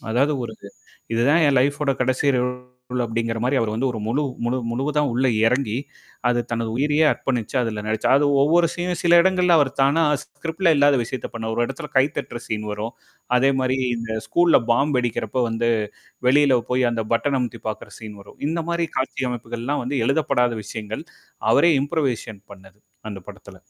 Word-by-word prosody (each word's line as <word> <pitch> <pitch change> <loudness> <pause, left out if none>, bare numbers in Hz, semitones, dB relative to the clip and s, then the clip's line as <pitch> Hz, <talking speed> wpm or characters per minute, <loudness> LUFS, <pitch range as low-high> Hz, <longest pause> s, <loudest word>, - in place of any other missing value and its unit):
அதாவது 135 +6 +2
ஒரு 115 - -6
இது, 100 - -11 0.4
இதுதான் 145 +8 +3
என் 135 -2 +3
லைஃப்வோட 140 +2 +1
கடைசி 130 +2 +1
ரோல் 125 0 -4
அப்படிங்கிற 115 0 -2
மாரி 135 +2 +1
அவர் 115 -2 0
வந்து 120 +4 -1
ஒரு 110 - -5
முழு 130 +7 0 0.2
முழு, 125 +2 0
முழுவதா 145 +5 0
உள்ள 130 +3 +1 0.2
இறங்கி, 125 -2 +1 0.5
அது 120 0 +2
தனது 115 -1 -2
உயிரையே 150 +4 +2
அர்ப்பணிச்சு 125 -1 -3
அதுல 110 -3 -3
நடிச்சார். 110 +4 +1
அது 145 - +2 0.2
ஒவ்வொரு 170 +4 +4
சீனும் 175 -1 -3
சில 175 0 +6
இடங்கள்ல 180 -2 +3
அவர் 140 -3 +3
தானா 140 +4 +3 0.2
ஸ்க்ரிப்டு 165 +3 -7
ல 165 - +6
இல்லாத 145 0 +4
விஷயத்த 120 +1 -5
பண்ணுவாரு. 110 -1 -3
ஒரு 120 - +1
இடத்துல 150 -3 -7
கை 130 - +6
தட்டுற 120 - -6
சீன் 105 -1 -3
வரும். 105 +3 -5 0.4
அதே 135 +2 +4
மாரி 130 0 0 0.2
இந்த 115 -1 -6 0.2
ஸ்கூல்ல 170 -4 +4
பாம் 140 +5 +2
வெடிக்கிறப்ப 120 0 -1
வந்து 115 +1 0 0.6
வெளியில 135 -2 +4
போய் 125 -1 +2
அந்த 115 - -2
பட்டன 115 +2 0
பட்டன் 140 -1 +2
அமுத்தி 120 -2 -3
பார்க்கற 110 -1 -6
சீன் 110 -2 -9
வரும். 100 - -15
இந்த 165 +2 -1
மாரி 170 0 0
காட்சி 130 0 -2
அமைப்புகள்லாம் 120 +3 -3
வந்து 130 +4 -4
எழுதப்படாத 130 -4 +1
விஷயங்கள், 110 +1 -6 0.5
அவரே 170 - +5
இம்ப்ரூவேஷன் 135 -8 -2
பண்ணது 95 0 -16 0.3
அந்த 100 - -6
படத்துல. - - -12
125 Hz, 175 wpm, -22 LUFS, 115-145 Hz, 0.6 s, சில